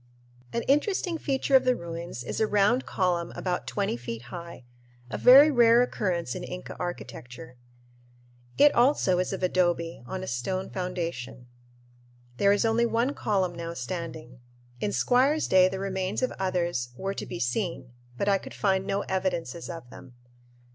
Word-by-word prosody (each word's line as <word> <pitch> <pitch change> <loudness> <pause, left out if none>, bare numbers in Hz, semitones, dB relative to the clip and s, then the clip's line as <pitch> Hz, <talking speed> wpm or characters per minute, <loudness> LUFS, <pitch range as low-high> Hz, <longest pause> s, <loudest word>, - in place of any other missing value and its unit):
An 235 - -2
interesting 330 +3 +1
feature 270 -1 +1
of 260 - +6
the 255 0 +3
ruins 170 - -6
is - - -4
a 220 - +2
round 210 +5 +2
column 175 -2 0
about 180 -1 -3
twenty 200 - -1
feet 120 -1 -6
high 170 -6 -8 0.5
a - - -2
very 275 +5 +8
rare 240 -2 +6
occurrence 175 - -2
in - - -6
Inca 180 - -7
architecture. 125 -8 -7 1.0
It 290 0 +6
also 240 -7 +3
is 185 - -1
of 190 -1 -4
adobe, 175 -3 0
on 185 +5 -5
a - - -6
stone 185 +11 -3
foundation. 170 -9 -4 0.9
There 200 +6 +4
is 205 +3 +2
only 230 +1 +2
one 235 +4 0
column 190 -8 0
now 170 0 -6
standing. 155 -3 -6 0.4
In - - -1
Squier's 255 - +2
day 185 0 +5
the 190 - -4
remains 190 +3 -2
of 255 - +1
others 175 -9 -1
were 195 +4 -3
to - - -6
be 120 -1 -6
seen, 125 - -2 0.2
but 200 - -1
I 200 -1 +3
could - - -10
find 190 -2 +1
no 200 +1 0
evidences 180 -6 -3
of 165 -7 -7
them. 130 -2 -13
185 Hz, 160 wpm, -27 LUFS, 165-220 Hz, 1.0 s, very